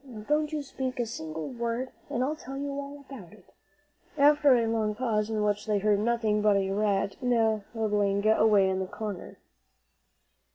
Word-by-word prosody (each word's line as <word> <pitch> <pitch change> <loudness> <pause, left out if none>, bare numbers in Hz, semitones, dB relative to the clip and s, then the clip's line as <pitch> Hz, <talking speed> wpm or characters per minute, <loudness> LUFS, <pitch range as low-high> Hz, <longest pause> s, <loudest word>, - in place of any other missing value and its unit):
"Now, 240 -6 -10
don't 300 +6 0
you 300 -2 -3
speak 260 -2 -5
a 240 - +1
single 160 -8 -6
word 235 +1 -3 0.2
and 245 - -1
I'll 295 +4 -1
tell 270 -3 -8
you 280 0 -3
all 280 0 -7
about 210 -10 -11
it," 200 -4 -20 0.6
after 290 -1 +5
a 235 -1 +2
long 220 -2 0
pause, 215 -3 -1
in 215 -1 -1
which 210 +1 -1
they 210 -1 +2
heard 205 0 +2
nothing 220 -1 +1
but 210 -1 +4
a 195 -1 -1
rat 200 -1 0
nibbling 215 -3 0
away 215 -3 +4
in 190 0 0
the 190 - -3
corner. 205 -2 -7
220 Hz, 175 wpm, -28 LUFS, 205-255 Hz, 0.6 s, after